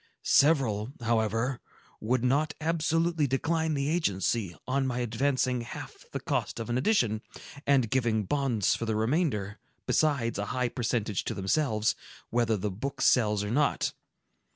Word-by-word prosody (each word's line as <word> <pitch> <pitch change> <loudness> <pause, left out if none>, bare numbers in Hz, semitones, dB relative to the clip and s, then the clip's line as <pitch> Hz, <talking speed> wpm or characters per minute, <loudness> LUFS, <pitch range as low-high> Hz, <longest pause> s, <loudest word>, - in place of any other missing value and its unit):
Several, 130 -6 +3
however, 115 +2 0 0.4
would 120 +3 0
not 145 +4 +1
absolutely 165 0 +1
decline 160 +4 0
the 140 0 -1
agency, 105 - 0
on 135 +1 +1
my 125 -1 -2
advancing 125 +1 0
half 115 - -7 0.2
the - - -3
cost - - -2
of 115 +1 -4
an 120 - +1
edition, 120 - +2 0.5
and 135 -4 +4
giving 115 -4 +1
bonds 120 -3 +1
for 115 - -2
the 110 - 0
remainder, 110 - 0 0.3
besides 130 -9 +1
a 100 - -1
high 125 -1 +1
percentage 115 -5 -1
to - - -3
themselves, 110 +2 +1 0.4
whether 115 -2 +2
the 100 +1 -2
book 135 +9 -5
sells 105 -4 +3
or 105 - -3
not. 145 +4 +1
125 Hz, 145 wpm, -29 LUFS, 110-140 Hz, 0.5 s, and